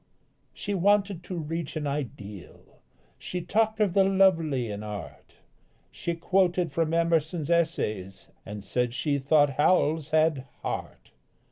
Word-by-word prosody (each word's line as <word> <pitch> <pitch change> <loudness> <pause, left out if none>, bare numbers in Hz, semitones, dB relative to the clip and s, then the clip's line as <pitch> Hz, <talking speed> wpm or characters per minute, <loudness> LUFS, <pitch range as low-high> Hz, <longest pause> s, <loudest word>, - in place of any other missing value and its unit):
_ - - -37 0.5
She 205 - -4
wanted 200 -1 +2
to 180 - -5
reach 165 0 -4
an 155 -1 -2
ideal; 105 -10 -7 0.4
She 180 - -4
talked 220 +5 0
of 205 -4 +2
the 195 0 +5
lovely 170 -10 +3
in 105 0 -5
art, 105 -2 -8 0.6
She 170 - -3
quoted 180 0 +1
from 165 -1 0
Emerson's 165 -1 +1
Essays, 105 - -1 0.2
And 105 0 -8
said 125 +2 -1
she 140 +2 0
thought 140 0 +3
Howells 155 -1 +2
had 155 -4 +2 0.2
"heart." - - -5
160 Hz, 135 wpm, -27 LUFS, 135-180 Hz, 0.6 s, the